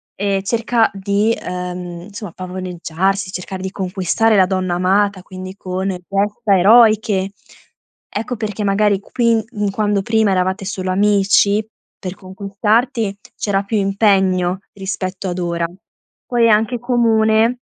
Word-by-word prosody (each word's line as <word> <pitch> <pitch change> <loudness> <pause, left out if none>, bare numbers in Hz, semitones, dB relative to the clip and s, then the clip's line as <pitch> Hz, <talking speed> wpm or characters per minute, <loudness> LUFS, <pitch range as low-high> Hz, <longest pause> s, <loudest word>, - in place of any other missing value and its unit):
ehm, 195 -1 0
cerca 230 +2 +1
di, 200 +3 +1
ehm, 180 -1 -6
insomma 205 -3 -8
pavoneggiarsi, 185 +1 -3
cercare 185 +1 -6
di 190 - -3
conquistare 195 +4 +1
la 190 -2 +5
donna 185 -2 -1
amata, 195 +2 +1
quindi 185 0 -9
con 185 0 -4
gesta 195 +3 0
eroiche. 215 -1 +4 0.8
Ecco 225 +4 -2
perché, 210 -1 -3
magari, 200 0 +2
qui 230 +1 +1
in 210 -3 -1
quando 205 0 0
prima 220 -1 +2
eravate 190 +2 0
solo 185 -1 -3
amici, 200 +1 +3 0.3
per 185 -1 -6
conquistarti 200 +3 -1 0.2
c'era 200 -1 0
più 215 +2 -1
impegno 195 -3 +2
rispetto 190 -1 -4
ad 175 +1 -3
ora. 170 -1 -1 0.6
Poi 240 -1 +2
è - - +6
anche 220 +3 +2
comune, 230 -1 +2
195 Hz, 130 wpm, -18 LUFS, 185-215 Hz, 0.8 s, è